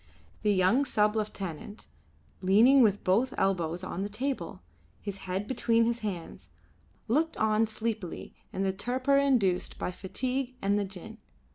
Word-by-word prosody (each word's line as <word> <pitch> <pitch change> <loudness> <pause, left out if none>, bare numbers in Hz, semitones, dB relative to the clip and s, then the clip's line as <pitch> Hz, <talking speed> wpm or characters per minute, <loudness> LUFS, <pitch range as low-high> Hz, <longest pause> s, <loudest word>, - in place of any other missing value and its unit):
The 210 - +2
young 195 +8 +3
sub 210 -5 +1
lieutenant, 205 -2 -5 0.6
leaning 225 +9 +6
with 205 -4 +3
both 230 +8 +2
elbows 180 -2 0
on 185 0 -4
the 200 - -2
table, 215 - -4 0.4
his 200 -2 -6
head 190 +3 -1
between 230 -1 +2
his 235 0 0
hands, 195 -7 -6 0.6
looked 310 +8 +1
on 220 +1 +2
sleepily 220 -4 -4 0.2
in 190 - -2
the 190 -1 0
torpor 255 +7 +1
induced 230 -11 +1
by - - -3
fatigue 255 +7 -3
and 200 -1 +1
the 200 - -1
gin. 190 -2 -10
210 Hz, 145 wpm, -29 LUFS, 190-245 Hz, 0.6 s, leaning